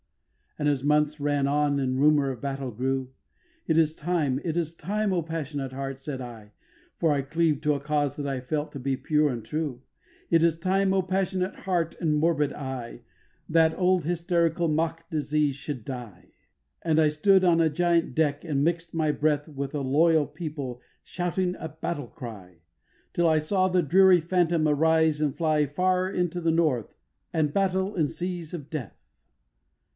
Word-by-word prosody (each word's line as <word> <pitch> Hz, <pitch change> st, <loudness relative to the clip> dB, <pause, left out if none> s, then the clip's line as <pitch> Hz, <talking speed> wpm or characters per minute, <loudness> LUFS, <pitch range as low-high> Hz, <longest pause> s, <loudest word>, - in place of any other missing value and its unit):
3. 150 Hz, -, -2 dB
And -, -, +4 dB
as 140 Hz, -3 st, 0 dB
months 150 Hz, +1 st, +2 dB
ran 145 Hz, -1 st, +1 dB
on 145 Hz, 0 st, +1 dB
and 130 Hz, -1 st, -1 dB
rumour 145 Hz, -1 st, +4 dB
of 125 Hz, -, -8 dB
battle 135 Hz, -2 st, -3 dB
grew, 130 Hz, +3 st, -2 dB, 0.6 s
'It 160 Hz, -, +2 dB
is 160 Hz, -1 st, +3 dB
time, 150 Hz, -5 st, 0 dB
it 165 Hz, -1 st, -2 dB
is 165 Hz, -1 st, -1 dB
time, 205 Hz, +4 st, -1 dB
O 175 Hz, -, +1 dB
passionate 145 Hz, -5 st, -4 dB
heart,' 135 Hz, 0 st, -5 dB
said 135 Hz, -1 st, -5 dB
I 115 Hz, -4 st, -10 dB, 0.5 s
(For 165 Hz, -, +2 dB
I 140 Hz, -, 0 dB
cleaved 150 Hz, +1 st, 0 dB
to 150 Hz, -1 st, +2 dB
a -, -, -3 dB
cause 145 Hz, -1 st, -1 dB
that 145 Hz, -, -5 dB
I 135 Hz, -2 st, -2 dB
felt 150 Hz, +4 st, -3 dB
to 140 Hz, -, -7 dB
be 135 Hz, +1 st, -1 dB
pure 150 Hz, +1 st, +2 dB
and 120 Hz, -4 st, -5 dB
true), 145 Hz, -2 st, -3 dB, 0.5 s
'It 165 Hz, -1 st, +5 dB
is 165 Hz, -1 st, +3 dB
time, 190 Hz, +3 st, +1 dB
O 190 Hz, -1 st, +2 dB
passionate 185 Hz, +1 st, -1 dB
heart 175 Hz, -4 st, -2 dB
and 155 Hz, -3 st, +2 dB
morbid 150 Hz, -2 st, +2 dB
eye, 130 Hz, -4 st, -6 dB, 0.5 s
That 160 Hz, 0 st, +3 dB
old 185 Hz, -2 st, +2 dB
hysterical 170 Hz, 0 st, +1 dB
mock 165 Hz, +1 st, -1 dB
disease 150 Hz, -2 st, 0 dB
should 140 Hz, -4 st, -6 dB
die.' 120 Hz, -9 st, -8 dB, 0.5 s
And 160 Hz, -2 st, +2 dB
I 155 Hz, -, +5 dB
stood 190 Hz, +6 st, +4 dB
on 170 Hz, -2 st, +4 dB
a 160 Hz, -, +3 dB
giant 170 Hz, +1 st, +1 dB
deck 145 Hz, -2 st, +1 dB
and 145 Hz, -4 st, 0 dB
mix'd 165 Hz, +1 st, -1 dB
my 155 Hz, -2 st, +2 dB
breath 150 Hz, 0 st, 0 dB
With 140 Hz, -2 st, -5 dB
a 145 Hz, -, -1 dB
loyal 155 Hz, +3 st, +3 dB
people 140 Hz, -8 st, -6 dB, 0.2 s
shouting 180 Hz, +1 st, -2 dB
a 160 Hz, -, -5 dB
battle 155 Hz, -3 st, -4 dB
cry, 95 Hz, -9 st, -10 dB, 0.5 s
Till 170 Hz, -1 st, +2 dB
I 160 Hz, -, +4 dB
saw 185 Hz, +5 st, +1 dB
the 180 Hz, -1 st, +2 dB
dreary 185 Hz, +3 st, +6 dB
phantom 170 Hz, -1 st, +1 dB
arise 160 Hz, 0 st, +3 dB
and 145 Hz, -3 st, 0 dB
fly 155 Hz, -3 st, +1 dB
Far 185 Hz, +5 st, +1 dB
into 180 Hz, -2 st, -1 dB
the 165 Hz, -1 st, +2 dB
North, 155 Hz, -9 st, 0 dB, 0.4 s
and 150 Hz, -3 st, 0 dB
battle, 190 Hz, 0 st, 0 dB
and 155 Hz, -5 st, +1 dB
seas 175 Hz, -2 st, -5 dB
of 150 Hz, -4 st, -9 dB
death. 145 Hz, -9 st, -5 dB
155 Hz, 180 wpm, -26 LUFS, 140-170 Hz, 0.6 s, dreary